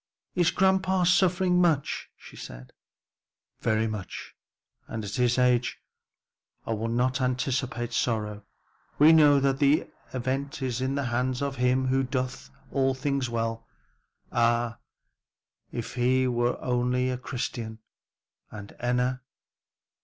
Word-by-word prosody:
"Is 175 Hz, -2 st, +3 dB
grandpa 190 Hz, -1 st, +2 dB
suffering 180 Hz, 0 st, +3 dB
much?" 160 Hz, -6 st, +1 dB
she -, -, -14 dB, 0.2 s
asked. -, -, -12 dB, 0.9 s
"Very 110 Hz, 0 st, +1 dB
much; 105 Hz, -4 st, -6 dB, 0.5 s
and 110 Hz, -2 st, -5 dB
at 100 Hz, -, -6 dB
his 125 Hz, -1 st, +2 dB
age 125 Hz, 0 st, +2 dB, 0.9 s
but -, -, -3 dB
I -, -, +2 dB
will 110 Hz, +1 st, -2 dB
not 125 Hz, +3 st, 0 dB
anticipate 125 Hz, -1 st, -1 dB
sorrow; 105 Hz, -3 st, -1 dB, 0.5 s
we 155 Hz, +3 st, +7 dB
know 145 Hz, -3 st, +6 dB
that 135 Hz, 0 st, +1 dB
the 145 Hz, +2 st, +3 dB, 0.3 s
event 135 Hz, +2 st, -3 dB
is 125 Hz, -1 st, -2 dB
in 130 Hz, +1 st, -1 dB
the 140 Hz, -, -1 dB
hands 125 Hz, +2 st, 0 dB
of 140 Hz, -2 st, -3 dB
him 125 Hz, +1 st, +2 dB
who 135 Hz, +1 st, +2 dB
doeth 130 Hz, 0 st, -3 dB, 0.2 s
all 135 Hz, -1 st, +1 dB
things 135 Hz, -1 st, -1 dB
well. 115 Hz, -1 st, -3 dB, 0.6 s
Ah, 120 Hz, 0 st, +1 dB, 0.9 s
if 120 Hz, -, -5 dB
he 130 Hz, +1 st, +2 dB
were 120 Hz, 0 st, 0 dB
only 125 Hz, +1 st, +1 dB
a 125 Hz, -, -2 dB
Christian! 120 Hz, -3 st, -4 dB, 0.7 s
And 100 Hz, -1 st, -10 dB
Enna! 125 Hz, +1 st, 0 dB
125 Hz, 130 wpm, -27 LUFS, 120-140 Hz, 0.9 s, we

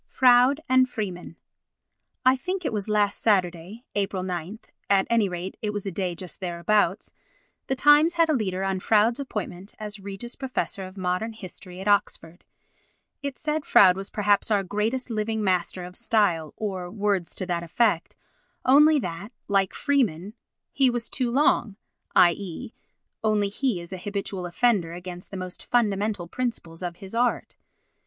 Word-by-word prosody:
Froude 255 Hz, +3 st, +5 dB
and 255 Hz, 0 st, +4 dB
Freeman 185 Hz, -7 st, -5 dB, 0.9 s
I 255 Hz, +1 st, +6 dB
think 365 Hz, +6 st, -4 dB
it 245 Hz, -, -1 dB
was 210 Hz, 0 st, -2 dB
last 205 Hz, -1 st, +1 dB
Saturday 190 Hz, +2 st, 0 dB
(Ap. 200 Hz, -1 st, -1 dB
9) 185 Hz, +2 st, -4 dB, 0.3 s
(at 195 Hz, -1 st, +4 dB
any 225 Hz, -4 st, +3 dB
rate 180 Hz, +1 st, -5 dB
it 215 Hz, -, -1 dB
was 205 Hz, -1 st, -3 dB
a 195 Hz, -, -2 dB
day 180 Hz, -1 st, -2 dB
just 180 Hz, 0 st, -7 dB
thereabouts) 185 Hz, +2 st, 0 dB, 0.5 s
the 265 Hz, -, 0 dB
Times 295 Hz, +5 st, +5 dB
had 335 Hz, -1 st, +4 dB
a 310 Hz, -, +2 dB
leader 190 Hz, -7 st, -1 dB
on 195 Hz, -1 st, -1 dB
Froude's 220 Hz, +5 st, +3 dB
appointment 205 Hz, -7 st, -6 dB
as 210 Hz, -1 st, -6 dB
Reg. 195 Hz, 0 st, -8 dB, 0.2 s
Prof. 260 Hz, -6 st, -3 dB
of 190 Hz, +1 st, -8 dB
Mod. 185 Hz, +5 st, -2 dB
Hist. 190 Hz, -3 st, -10 dB
at 185 Hz, +2 st, -8 dB
Oxford. 175 Hz, -4 st, 0 dB, 0.8 s
It 280 Hz, -2 st, -4 dB
said 305 Hz, 0 st, -2 dB
Froude 185 Hz, -8 st, +6 dB
was 195 Hz, +1 st, -6 dB
perhaps 205 Hz, 0 st, +1 dB
our 205 Hz, -2 st, +2 dB
greatest 220 Hz, +7 st, -2 dB
living 220 Hz, 0 st, -1 dB
master 185 Hz, -1 st, 0 dB
of 180 Hz, +1 st, -9 dB
style, 180 Hz, -10 st, +1 dB
or 190 Hz, -4 st, -4 dB
words 200 Hz, -3 st, -1 dB
to 185 Hz, -, -3 dB
that 175 Hz, -2 st, -1 dB
effect, 170 Hz, +1 st, 0 dB, 0.5 s
only 300 Hz, +4 st, +6 dB
that, 200 Hz, -3 st, -4 dB, 0.2 s
like 195 Hz, -2 st, +1 dB
Freeman, 215 Hz, -, 0 dB, 0.4 s
he 270 Hz, -2 st, +3 dB
was 240 Hz, -1 st, -3 dB
too 255 Hz, -3 st, 0 dB
long: 240 Hz, -5 st, +2 dB, 0.4 s
i.e. 190 Hz, +6 st, +2 dB, 0.5 s
only 210 Hz, -2 st, +2 dB
he 225 Hz, -1 st, -1 dB
is 170 Hz, +2 st, -9 dB
an 185 Hz, -, -5 dB
habitual 195 Hz, -2 st, -4 dB
offender 175 Hz, -3 st, +1 dB
against 180 Hz, 0 st, -8 dB
the 195 Hz, -, -7 dB
most 185 Hz, -1 st, -7 dB
fundamental 205 Hz, -5 st, 0 dB
principles 190 Hz, -7 st, -4 dB
of 175 Hz, -1 st, -4 dB
his 195 Hz, +3 st, -9 dB
art. 240 Hz, +1 st, 0 dB
205 Hz, 160 wpm, -25 LUFS, 185-235 Hz, 0.9 s, I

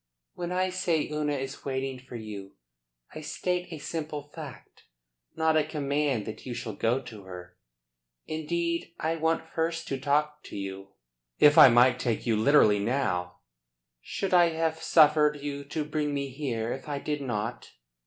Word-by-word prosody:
When 175 Hz, 0 st, -5 dB
I 185 Hz, +1 st, +1 dB
say 175 Hz, -4 st, 0 dB
Una 150 Hz, -1 st, 0 dB
is 135 Hz, 0 st, -5 dB
waiting 135 Hz, -1 st, -3 dB
for 125 Hz, -1 st, -11 dB
you, 105 Hz, -4 st, -8 dB, 0.6 s
I 155 Hz, -, -7 dB
state 180 Hz, +3 st, -2 dB
a 160 Hz, -, -5 dB
simple 150 Hz, -1 st, -4 dB
fact, 150 Hz, -6 st, -10 dB, 0.5 s
not 160 Hz, 0 st, +2 dB
a 155 Hz, -, +4 dB
command 145 Hz, -5 st, -1 dB
that 110 Hz, -, -7 dB
you 125 Hz, -2 st, -5 dB
shall 110 Hz, -, -5 dB
go 115 Hz, +5 st, +1 dB
to 110 Hz, -5 st, -11 dB
her. 90 Hz, -1 st, -10 dB, 0.7 s
Indeed 170 Hz, +2 st, -2 dB
I 160 Hz, +1 st, -1 dB
want 160 Hz, +1 st, 0 dB
first 165 Hz, 0 st, -1 dB
to 135 Hz, -, -2 dB
talk 150 Hz, +2 st, +1 dB
to -, -, -8 dB
you." 95 Hz, 0 st, -6 dB, 0.4 s
"If 145 Hz, 0 st, +7 dB
I -, -, +10 dB
might 120 Hz, +2 st, +5 dB
take 115 Hz, -4 st, -1 dB
you 115 Hz, -2 st, +2 dB
literally 110 Hz, -3 st, +5 dB
now 90 Hz, -7 st, -1 dB, 0.3 s
" -, -, -59 dB
"Should 190 Hz, -, -3 dB
I 175 Hz, -1 st, +6 dB
have 160 Hz, 0 st, -1 dB
suffered 150 Hz, -2 st, +5 dB
you 140 Hz, 0 st, -5 dB
to 150 Hz, +2 st, -3 dB
bring 150 Hz, -1 st, -1 dB
me 140 Hz, -1 st, -2 dB
here 125 Hz, -5 st, -3 dB
if 135 Hz, +3 st, -8 dB
I 145 Hz, -, -2 dB
did 150 Hz, +1 st, -3 dB
not?" 120 Hz, -3 st, -3 dB
145 Hz, 170 wpm, -28 LUFS, 120-155 Hz, 0.7 s, I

